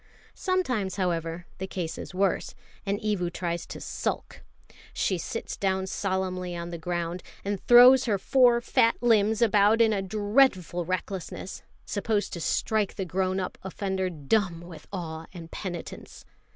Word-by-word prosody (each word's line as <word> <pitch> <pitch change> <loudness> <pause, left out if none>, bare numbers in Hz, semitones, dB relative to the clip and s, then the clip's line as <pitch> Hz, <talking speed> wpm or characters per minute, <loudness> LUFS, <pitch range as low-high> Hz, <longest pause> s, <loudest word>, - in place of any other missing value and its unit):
Sometimes, 255 - -1
however, 170 -2 -2
the 190 - -3
case 170 -4 -4
is - - -7
worse, 190 +1 0 0.3
and 200 +1 0
Evu 200 -5 -1
tries 170 -2 -3
to - - -7
sulk. - - -4 0.5
She 185 -3 0
sits 230 +7 -4
down 190 -1 0
solemnly 185 -2 -2
on 170 0 -5
the 170 - -5
ground, 175 +1 -3 0.2
and 200 -1 -2
throws 250 +2 +9
her 210 -4 +1
four 240 +3 +4
fat 230 -1 +3
limbs 220 -1 +4
about 210 0 +4
in 225 -1 +5
a 200 - 0
dreadful 205 -3 +2
recklessness, 185 0 -4 0.2
supposed 210 0 -1
to 170 - -5
strike 215 +3 0
the 190 - -3
grown 185 +1 0
up 185 - -4
offender 190 0 -2
dumb 170 +2 0
with 170 -1 -11
awe 165 -4 -5
and 165 -2 -9
penitence. 175 -4 -7
190 Hz, 150 wpm, -27 LUFS, 175-215 Hz, 0.5 s, throws